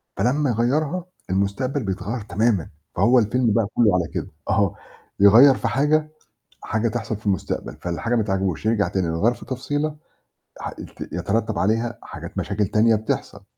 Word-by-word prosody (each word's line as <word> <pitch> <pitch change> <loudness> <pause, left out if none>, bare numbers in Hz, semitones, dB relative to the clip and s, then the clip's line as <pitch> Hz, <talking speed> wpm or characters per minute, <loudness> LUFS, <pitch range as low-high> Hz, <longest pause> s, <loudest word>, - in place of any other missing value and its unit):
فلمّا 135 +7 +1
يغيّرها 145 - 0 0.2
المستقبل 100 +9 -1
بيتغيّر 100 +4 -3
تمامًا 105 -2 0 0.3
فهو 120 +7 +5
الفيلم 115 0 +2
بقى 115 -3 +2
كُلّه 110 -6 +4
على 85 -3 0
كده، - - -3 0.2
أها - - +2 0.4
يغيّر 120 +7 +8
في - - -2
حاجة، 150 +4 +2 0.5
حاجة 110 +2 0
تحصل 110 -1 -3
في 110 - -15
المستقبل، 95 -3 -2
فالحاجة 90 +7 -2
ما 115 - +3
تعجبهوش، 95 -2 -1
يرجع 105 -4 +2
تاني 95 0 -1
يغيّر 85 +9 +1
في - - -12
تفصيلة 145 +4 -2 0.6
ح - - -4
ت - - -11
يترتب 105 +6 -1
عليها 115 +3 0
حاجات - - -8
مشاكل 105 0 0
تانية 110 +4 +3
بتحصل. 105 -2 -3
110 Hz, 155 wpm, -23 LUFS, 100-125 Hz, 0.6 s, يغيّر